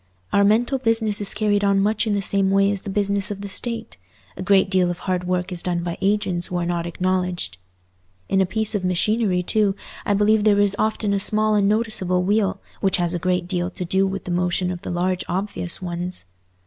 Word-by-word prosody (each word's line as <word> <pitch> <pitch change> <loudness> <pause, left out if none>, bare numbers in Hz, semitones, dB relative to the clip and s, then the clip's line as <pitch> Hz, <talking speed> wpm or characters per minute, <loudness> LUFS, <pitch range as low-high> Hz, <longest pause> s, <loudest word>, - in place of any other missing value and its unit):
Our 200 - +4
mental 235 +6 +2
business 225 -4 0
is 205 - +1
carried 205 -1 +1
on 200 -1 +3
much 215 +3 +1
in 210 - +1
the 200 -1 0
same 195 0 +2
way 195 +1 +3
as 200 -2 -3
the 205 - -7
business 200 0 +1
of 200 -1 -5
the 200 - -5
State: 235 +3 -5 0.4
a - - -7
great 195 +1 +3
deal 185 -2 +2
of 175 - -3
hard 180 -1 -2
work 180 +1 -1
is 175 -1 -2
done 175 -1 -1
by 170 -1 -3
agents 190 -3 0
who 180 - -3
are 175 - -1
not 170 -1 -2
acknowledged. 180 - -2 0.7
In 195 - +2
a 190 - +2
piece 220 +2 0
of 205 -3 -1
machinery, 185 +1 +1
too, 205 0 +1 0.3
I 205 - +1
believe 210 +1 +3
there 205 -1 +4
is 205 -1 +3
often 215 -1 0
a 200 - +1
small 215 +2 +3
unnoticeable 205 -3 +1
wheel 195 0 +1 0.2
which 190 -1 +2
has 175 -1 0
a 175 - -2
great 180 0 0
deal 180 -1 -2
to 180 -1 -6
do 190 +3 +1
with 195 0 -4
the 180 - -5
motion 180 +1 0
of 175 -1 -6
the - - -6
large 180 +1 -1
obvious 185 -1 -2
ones. 175 - -4
195 Hz, 220 wpm, -22 LUFS, 180-205 Hz, 0.7 s, Our